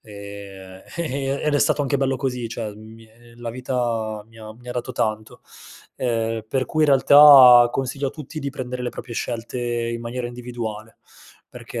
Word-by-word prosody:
ehm, 100 Hz, -3 st, -11 dB
ehm, 140 Hz, -4 st, -2 dB
ed 150 Hz, -, +1 dB
è -, -, +3 dB
stato 145 Hz, -, +2 dB
anche 140 Hz, 0 st, 0 dB
bello 135 Hz, -1 st, 0 dB
così, 125 Hz, -3 st, -3 dB
cioè 110 Hz, -2 st, -5 dB
mi 110 Hz, +1 st, -14 dB
è 115 Hz, +2 st, -21 dB
la 120 Hz, 0 st, -6 dB
vita 115 Hz, -4 st, -3 dB
mi 115 Hz, -, -18 dB
ha 110 Hz, -1 st, -10 dB
mi 120 Hz, +2 st, -15 dB
ha -, -, -4 dB
dato 125 Hz, +1 st, -4 dB
tanto. 110 Hz, -2 st, -3 dB, 0.6 s
Ehm, 115 Hz, -2 st, -2 dB
per 130 Hz, +1 st, -1 dB
cui 155 Hz, -, 0 dB
in 155 Hz, -, +3 dB
realtà, 135 Hz, -3 st, +8 dB
consiglio 135 Hz, +2 st, -2 dB
a -, -, -7 dB
tutti 150 Hz, +1 st, -9 dB
di 140 Hz, -2 st, -4 dB
prendere 125 Hz, -2 st, -6 dB
le 120 Hz, -, -3 dB
proprie 120 Hz, 0 st, -9 dB
scelte 120 Hz, +1 st, -4 dB
in 120 Hz, -1 st, -2 dB
maniera 120 Hz, +1 st, -5 dB
individuale, 120 Hz, -3 st, -7 dB, 0.5 s
perché -, -, -8 dB
120 Hz, 185 wpm, -22 LUFS, 110-130 Hz, 0.6 s, realtà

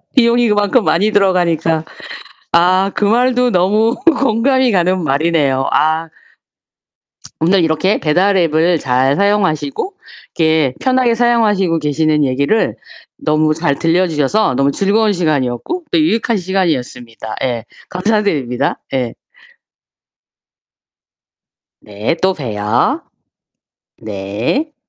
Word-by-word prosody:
비용이 240 Hz, -1 st, +3 dB
그만큼 205 Hz, +3 st, +2 dB
많이 210 Hz, +5 st, +1 dB
들어가니까. 170 Hz, -5 st, +1 dB, 0.7 s
아 185 Hz, +3 st, +3 dB
그 -, -, -1 dB
말도 250 Hz, +3 st, +2 dB
너무 210 Hz, +5 st, +2 dB
공감이 260 Hz, -4 st, +1 dB
가는 185 Hz, -1 st, +1 dB
말이네요. 145 Hz, -2 st, 0 dB
아. 160 Hz, +1 st, +1 dB, 1.3 s
오늘 180 Hz, +3 st, +3 dB
이렇게 165 Hz, +5 st, +1 dB
배달 185 Hz, +6 st, +1 dB
앱을 165 Hz, 0 st, +2 dB
잘 130 Hz, +1 st, +1 dB
사용하시고 195 Hz, -, 0 dB, 0.4 s
이렇게 160 Hz, -5 st, +2 dB
편하게 255 Hz, -2 st, +1 dB
사용하시고 215 Hz, -8 st, +1 dB
계시는 150 Hz, 0 st, 0 dB
얘기를 140 Hz, +12 st, 0 dB, 0.4 s
너무 155 Hz, -, +1 dB
잘 150 Hz, -3 st, -1 dB
들려 175 Hz, +3 st, +2 dB
주셔서 150 Hz, +1 st, 0 dB
너무 140 Hz, +2 st, +1 dB
즐거운 205 Hz, +5 st, +1 dB
시간이었고 155 Hz, -, -2 dB
또 -, -, +1 dB
유익한 230 Hz, -6 st, 0 dB
시간이었습니다. 130 Hz, -, -3 dB
예. 120 Hz, -3 st, -3 dB, 0.3 s
감사드립니다. 180 Hz, -, -1 dB, 0.2 s
예. 125 Hz, -3 st, -2 dB, 2.7 s
네. 105 Hz, +9 st, -3 dB
또 190 Hz, 0 st, +2 dB
봬요. 110 Hz, -, -1 dB, 1.0 s
네. 110 Hz, -, -3 dB
170 Hz, 250 characters per minute, -15 LUFS, 145-210 Hz, 2.7 s, 비용이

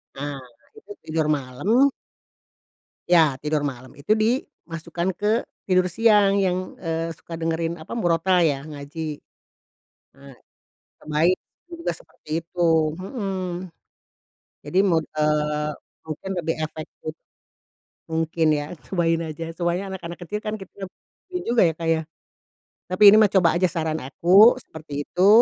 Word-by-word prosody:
A 140 Hz, +1 st, -4 dB, 0.5 s
itu 435 Hz, -, -14 dB
tidur 155 Hz, -1 st, -1 dB
malam. 200 Hz, -, +2 dB, 1.2 s
Ya 160 Hz, -6 st, +5 dB
tidur 150 Hz, +2 st, -1 dB
malam 130 Hz, -3 st, -5 dB
itu 210 Hz, +10 st, 0 dB
dimasukkan 175 Hz, -, -2 dB
ke 210 Hz, +5 st, 0 dB, 0.2 s
tidur 185 Hz, -1 st, +4 dB
siang 200 Hz, +1 st, +4 dB
yang, 185 Hz, -1 st, -1 dB
eee, 165 Hz, -1 st, -2 dB
suka 165 Hz, +1 st, -9 dB
dengerin 165 Hz, +1 st, -1 dB
apa 160 Hz, -, -9 dB
murotal 180 Hz, -3 st, +2 dB
ya? 145 Hz, -4 st, +1 dB
Ngaji, 150 Hz, +1 st, -6 dB, 0.9 s
a 140 Hz, -2 st, -15 dB, 0.7 s
cobain 160 Hz, +4 st, +2 dB, 0.3 s
juga 340 Hz, -1 st, -3 dB
seperti 160 Hz, -, -6 dB
itu, 170 Hz, +2 st, -7 dB, 0.4 s
mhm, 185 Hz, -3 st, -4 dB, 1.0 s
jadi 185 Hz, -, +1 dB
mung 165 Hz, -5 st, +2 dB
eee, 150 Hz, 0 st, 0 dB, 0.3 s
mungkin 155 Hz, +4 st, -6 dB
lebih 165 Hz, 0 st, -1 dB
efektif. 155 Hz, 0 st, -6 dB, 1.0 s
Mungkin 160 Hz, 0 st, 0 dB
ya 145 Hz, -, -3 dB, 0.2 s
cobain 165 Hz, -3 st, +1 dB
aja 160 Hz, 0 st, -5 dB
soalnya 175 Hz, +3 st, -1 dB
anak-anak 170 Hz, -2 st, -7 dB
kecil 210 Hz, +4 st, -3 dB
kan 215 Hz, 0 st, -3 dB
kita 195 Hz, -1 st, -9 dB, 0.4 s
bingung 360 Hz, -1 st, -4 dB
juga 240 Hz, -, +4 dB
ya -, -, -3 dB
Kak 165 Hz, -, -4 dB
ya? 160 Hz, -, -1 dB, 0.9 s
Tapi 185 Hz, +3 st, -2 dB
ini -, -, +8 dB
mah 215 Hz, -, +6 dB
coba 190 Hz, -3 st, +4 dB
aja 185 Hz, -, +4 dB
saran 160 Hz, -2 st, -2 dB
aku 185 Hz, -, +6 dB
seperti, 145 Hz, -2 st, -6 dB
itu 185 Hz, +5 st, +2 dB
165 Hz, 130 wpm, -23 LUFS, 155-190 Hz, 1.2 s, ini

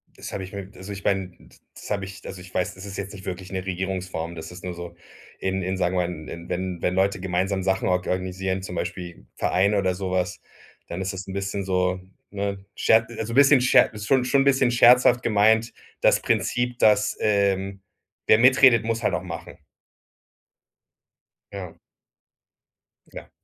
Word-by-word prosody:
Das -, -, -8 dB
hab -, -, -4 dB
ich 95 Hz, -, -8 dB
mir 100 Hz, -1 st, -6 dB
also 95 Hz, +2 st, -9 dB
ich 100 Hz, -, -9 dB
mein, 95 Hz, -2 st, -1 dB
d -, -, -21 dB, 0.2 s
das -, -, -11 dB
hab 100 Hz, -2 st, -1 dB
ich 100 Hz, +1 st, -9 dB
also 95 Hz, -, -7 dB
ich 90 Hz, 0 st, -13 dB
weiß, 90 Hz, -, -1 dB
das 95 Hz, +2 st, -10 dB
ist 100 Hz, 0 st, -7 dB
jetzt 100 Hz, +1 st, -5 dB
nicht 95 Hz, -2 st, -11 dB
wirklich 95 Hz, 0 st, -6 dB
'ne 95 Hz, 0 st, -4 dB
Regierungsform. 90 Hz, -3 st, -4 dB
Das 80 Hz, +1 st, -8 dB
ist 90 Hz, 0 st, -11 dB
nur 90 Hz, -1 st, -4 dB
so 85 Hz, 0 st, -8 dB, 0.4 s
in 95 Hz, 0 st, -2 dB
in 95 Hz, +1 st, -2 dB
sagen 90 Hz, 0 st, 0 dB
wir 90 Hz, -1 st, +1 dB
mal, 80 Hz, -3 st, -7 dB
in 85 Hz, 0 st, -9 dB
wenn 90 Hz, -1 st, -3 dB
wenn 90 Hz, -, 0 dB
Leute 95 Hz, 0 st, +1 dB
gemeinsam 95 Hz, +1 st, -1 dB
Sachen 95 Hz, 0 st, 0 dB
or 90 Hz, -, +3 dB
organisieren, 95 Hz, +1 st, -2 dB
zum 90 Hz, -1 st, -7 dB
Beispiel 85 Hz, -8 st, -5 dB
Vereine 100 Hz, +3 st, +2 dB
oder 95 Hz, -2 st, +1 dB
so 95 Hz, -1 st, -4 dB
was, 90 Hz, -1 st, -1 dB, 0.5 s
dann 85 Hz, +2 st, -5 dB
ist 95 Hz, 0 st, -3 dB
das 95 Hz, 0 st, -7 dB
'n 95 Hz, -, -6 dB
bisschen 100 Hz, 0 st, -3 dB
so, 90 Hz, -1 st, 0 dB, 0.3 s
ne, 100 Hz, -1 st, -4 dB
sche 110 Hz, 0 st, +4 dB
also 115 Hz, +1 st, -4 dB
'n -, -, -3 dB
bisschen 140 Hz, -1 st, +7 dB
sche 130 Hz, -, +5 dB
ist 105 Hz, -1 st, -7 dB
schon 130 Hz, +1 st, +3 dB
-schon 135 Hz, +2 st, +3 dB
'n -, -, +1 dB
bisschen 135 Hz, -2 st, +4 dB
scherzhaft 120 Hz, 0 st, +5 dB
gemeint: 110 Hz, +1 st, +3 dB, 0.3 s
Das -, -, +4 dB
Prinzip, 120 Hz, 0 st, 0 dB
dass, 105 Hz, -1 st, +3 dB
ähm, 100 Hz, -2 st, +1 dB, 0.5 s
wer 110 Hz, -, +7 dB
mitredet, 130 Hz, -1 st, +6 dB
muss 115 Hz, 0 st, -1 dB
halt -, -, +1 dB
auch -, -, -4 dB
machen. -, -, -8 dB, 2.0 s
Ja. 90 Hz, -4 st, -7 dB, 1.4 s
Ja. -, -, -10 dB
95 Hz, 190 wpm, -24 LUFS, 90-105 Hz, 2.0 s, bisschen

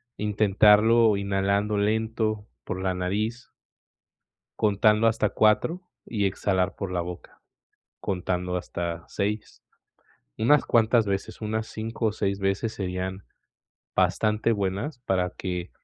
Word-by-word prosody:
intentarlo 105 Hz, +2 st, +4 dB
inhalando 100 Hz, +1 st, 0 dB
lento 110 Hz, 0 st, 0 dB, 0.2 s
por 95 Hz, -, -4 dB
la 95 Hz, -1 st, 0 dB
nariz 105 Hz, +7 st, -2 dB, 1.1 s
contando 105 Hz, +1 st, +3 dB
hasta 110 Hz, -2 st, +2 dB
4 110 Hz, -, +2 dB, 0.2 s
y 105 Hz, -3 st, -1 dB
exhalar 95 Hz, 0 st, 0 dB
por 100 Hz, -2 st, -5 dB
la 90 Hz, -1 st, 0 dB
boca, 90 Hz, +1 st, -9 dB, 0.6 s
contando 90 Hz, -1 st, -2 dB
hasta 85 Hz, -1 st, -4 dB
6, 105 Hz, +2 st, -4 dB, 0.7 s
unas 140 Hz, +6 st, +3 dB
cuantas 115 Hz, -1 st, +3 dB
veces, 100 Hz, 0 st, -3 dB
unas 110 Hz, +1 st, -2 dB
5 115 Hz, +2 st, -5 dB
o 110 Hz, -, +1 dB
6 100 Hz, -2 st, -1 dB
veces 95 Hz, +3 st, -1 dB
serían 95 Hz, 0 st, -4 dB, 0.7 s
bastante 110 Hz, +1 st, +2 dB
buenas, 100 Hz, +7 st, -2 dB
para 95 Hz, -6 st, 0 dB
que 90 Hz, -1 st, -4 dB
105 Hz, 115 wpm, -26 LUFS, 95-110 Hz, 1.1 s, intentarlo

